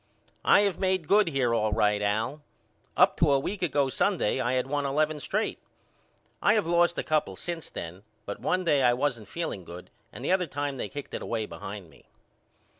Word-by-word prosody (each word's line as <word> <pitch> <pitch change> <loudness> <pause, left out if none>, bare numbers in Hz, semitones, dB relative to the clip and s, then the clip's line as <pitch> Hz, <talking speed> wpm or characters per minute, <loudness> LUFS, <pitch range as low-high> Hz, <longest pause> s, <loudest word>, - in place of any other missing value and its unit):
I - - +6
have 200 -4 0
made 185 -4 0
good 205 +1 +5
here 135 -6 +1
all 110 -2 +1
right 105 0 +2
Al. 110 +8 -1 0.6
Up - - +5
to 155 -3 +4
a 140 - +5
week 195 +8 -4
ago 145 -5 +1
Sunday 150 - +1
I 120 +1 0
had 130 -1 +1
won 145 +1 -1
eleven 150 +2 0
straight. - - -2 0.8
I 205 +3 +4
have 215 - +1
lost 175 +1 +2
a - - -1
couple 150 - 0
since 170 - -5
then, 85 +3 -7 0.2
but 100 - -5
one 185 0 0
day 150 -5 +3
I 125 -1 +5
wasn't 125 -5 -1
feeling 155 - -4
good 85 +1 -11 0.2
and - - -8
the - - +1
other 185 -2 +2
time 145 -1 -3
they - - -4
kicked 145 -1 -8
it - - -4
away 110 -2 -2
behind 100 -5 -8
me. - - -21
140 Hz, 200 wpm, -27 LUFS, 110-170 Hz, 0.8 s, I